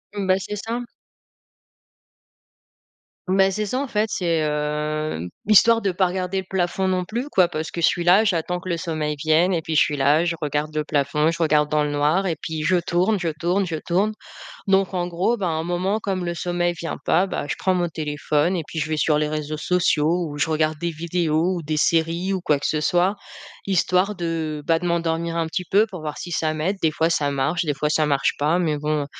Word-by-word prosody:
Bah, 190 -2 +2
c'est 210 +2 -5
ça. 230 +4 -4 2.5
Beh, 190 +1 +4
c'est 210 +2 -2
ça, 255 +6 -2
en 280 - -3
fait, 210 +1 +1
c'est, 170 -4 0
heu, 150 - -2 0.2
histoire 225 +2 +6
de 195 - 0
pas 185 +1 +2
regarder 185 +1 -3
le 190 - -6
plafond 190 0 0
non 185 -1 0
plus, 240 +9 -4
quoi. 185 -10 +3
Parce 155 0 -4
que 170 - -4
je - - +5
suis 175 -1 0
là, 185 +5 +6
j'attends 180 -3 -1
que 185 - -7
le 170 - 0
sommeil 155 -3 -3
vienne 160 +5 +3
et 165 - 0
puis 160 0 -4
je 150 - +6
suis 150 - +1
là, 145 +4 +3
je 175 -1 0
regarde 150 +1 -2
le 155 0 -1
plafond, 150 +1 +1
je 165 - -2
regarde 150 -1 +2
dans 150 0 +2
le 150 - -2
noir 150 +6 +1
et 165 -5 -1
puis 160 -1 -4
je 180 +3 +3
tourne 180 +4 +1
je 175 - -2
tourne 180 +4 0
je 165 - -3
tourne, 195 +5 +1 0.5
donc 195 0 +2
en 175 -1 -1
gros, 180 +7 0
bah, 190 - -1
à - - 0
un 160 0 -2
moment 180 +5 -1
comme 190 -3 -2
le 170 - -2
sommeil 175 0 -1
vient 170 -1 -5
pas, 190 +2 +3
bah, - - -3
je - - -1
prends 190 - +1
mon 175 -1 0
téléphone 155 +2 -1
et 165 - -2
puis 165 - -8
je 155 0 -2
vais 155 - -1
sur 150 0 +2
les 150 0 0
réseaux 155 0 -3
sociaux 170 +1 +1
où 145 0 -7
je 160 - 0
regarde 155 0 +1
des 170 +2 -2
vidéos 170 +1 0
ou 170 - -4
des 155 0 -2
séries 165 +4 +1
ou 185 - -2
quoi 150 -5 +1
que - - -2
ce 155 -1 -1
soit, 180 +5 +2 0.5
histoire 190 +1 +1
de, 160 -3 -3
bah, 165 -1 +3
de 180 - -5
m'endormir 170 -1 -1
un 165 - 0
petit 180 +3 -3
peu 205 +3 +5
pour 185 -5 -8
voir 150 -1 -5
si 175 - -7
ça 155 0 0
m'aide, 160 +6 -1
des 160 - +2
fois, 160 +2 +1
ça 145 -3 +1
marche, 140 +5 0
des 150 -3 -1
fois 150 +2 -1
ça 155 0 +2
marche 140 -2 +1
pas 155 +5 +1
mais 155 -4 0
bon, 150 -1 -1
170 Hz, 230 wpm, -22 LUFS, 155-185 Hz, 2.5 s, histoire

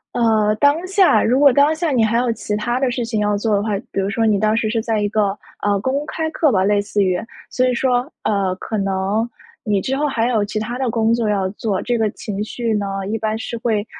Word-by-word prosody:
呃， 220 -3 +2
当 305 +6 +3
下， 385 -1 +4
如 255 +5 +2
果 285 -1 +7
当 285 +4 +3
下 325 -1 -1
你 250 -4 +2
还 230 +2 +1
有 245 -1 +1
其 210 -2 -3
它 240 +4 -1
的 265 -1 +1
事 245 0 -2
情 225 -2 -2
要 210 -1 +1
做 215 +1 0
的 200 - +2
话， 210 -2 -1
比 - - -2
如 195 +1 0
说 225 +3 0
你 210 -2 +2
当 215 +1 +2
时 220 -1 0
是 225 0 0
在 220 -2 -1
一 205 - 0
个， 205 -2 0 0.2
呃， 205 -1 +1
公 270 +6 -1
开 320 0 -2
课 310 -4 +2
吧， 190 -2 +3
类 205 +1 +2
似 205 0 0
于。 185 0 0 0.3
所 255 0 +1
以 250 - +1
说， 250 +1 +1 0.3
呃， 195 -3 0
可 215 +3 -5
能 195 +3 -1 0.4
你 205 -2 +1
之 270 +7 -2
后 300 - +1
还 240 -4 0
有 220 -4 +1
其 215 +1 -5
它 230 +4 -3
的 260 -2 0
工 225 0 +1
作 230 -2 0
要 195 -3 0
做， 205 -1 -2
这 240 -1 -1
个 220 -1 +1
情 205 -2 -5
绪 230 0 -2
呢， 195 -1 -3
一 225 - -1
般 220 0 -2
是 235 +1 -5
会 225 -3 -1
220 Hz, 275 characters per minute, -19 LUFS, 205-245 Hz, 0.4 s, 果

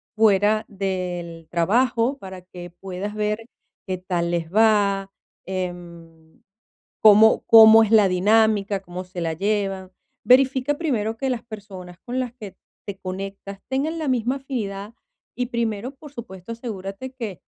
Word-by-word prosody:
fuera 215 0 +3
del 180 -4 -4
trabajo 230 - +1
para 190 -3 -9
que 180 -1 -11
puedas 190 +3 -7
ver 210 0 -1 0.5
qué 185 -1 -2
tal 175 -2 -2
les 170 0 -3
va, 200 -3 +3 0.3
em, 170 -3 -7 0.6
cómo 215 +1 +6
cómo 225 0 +9
es 215 - -2
la 215 -3 +6
dinámica, 205 +1 +2
cómo 180 -1 -7
se 180 -1 -8
la 165 -1 -1
llevan. 195 0 -2 0.3
Verifica 260 +2 +3
primero 225 -9 -1
que 265 +3 -2
las 245 -2 -2
personas 195 -5 -10
con 250 +5 -4
las 250 -2 -3
que 215 -6 -10 0.3
te 200 -1 -6
conectas 195 +1 -7
tengan 285 +5 -1
la 310 - -3
misma 250 0 0
afinidad 215 -6 -5 0.4
y 250 0 -2
primero, 235 0 -2
por 290 +1 -13
supuesto, 205 -5 -9
asegúrate 225 +1 -7
que 225 -8 -7
205 Hz, 140 wpm, -23 LUFS, 185-230 Hz, 0.6 s, cómo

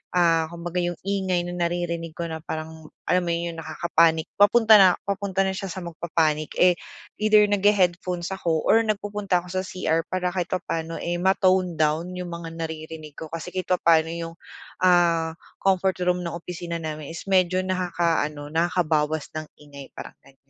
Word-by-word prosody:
ah, 165 -2 +3
kumbaga, 170 +1 -4
yung 175 0 -1
ingay 190 -3 0
na 175 - -5 0.2
naririnig 170 -2 -3
ko 170 - -4
na 160 - -4
parang, 160 0 -7 0.2
alam 180 0 +2
mo - - 0
'yon, 170 0 -2
yung 165 - -9
nakaka-panic, 160 0 +1
papunta 220 +1 +7
na 185 -2 +7
papunta 195 -1 -1
na 190 - 0
siya 195 +1 -5
sa 185 0 -6
magpa-panic, 160 -2 -1
eh, 180 -1 +4 0.4
either 215 0 +5
naghe-headphones 190 -3 +1
ako 165 -4 -1
or 225 - +5
nagpupunta 205 -3 -1
ako 180 - -10
sa - - -2
CR 165 -2 -1
para 180 -1 -1
kahit 180 -2 -2
papa'no, 165 -3 -3
eh, 175 0 -3
ma-tone 185 -1 +2
down 155 +2 +1
yung 180 -1 -5
mga 165 -1 -7
naririnig 160 -2 -7
ko 160 - -6
kasi 165 0 -6
kahit 185 -1 -4
papa'no 165 -3 +3
yung, 165 0 -5 0.5
ah, 170 -3 +3 0.2
comfort 190 -1 +1
room 180 0 +1
ng 170 - -4
opisina 170 0 -5
namin 155 -2 -6
is 165 - -7
medyo 185 -1 +3
nakakaaano, 170 -5 -1
nakakabawas 160 -3 +1
ng 155 0 -4
ingay, 140 -2 -12
parang - - -8
ganyan. 135 - -20
175 Hz, 170 wpm, -24 LUFS, 160-185 Hz, 0.5 s, papunta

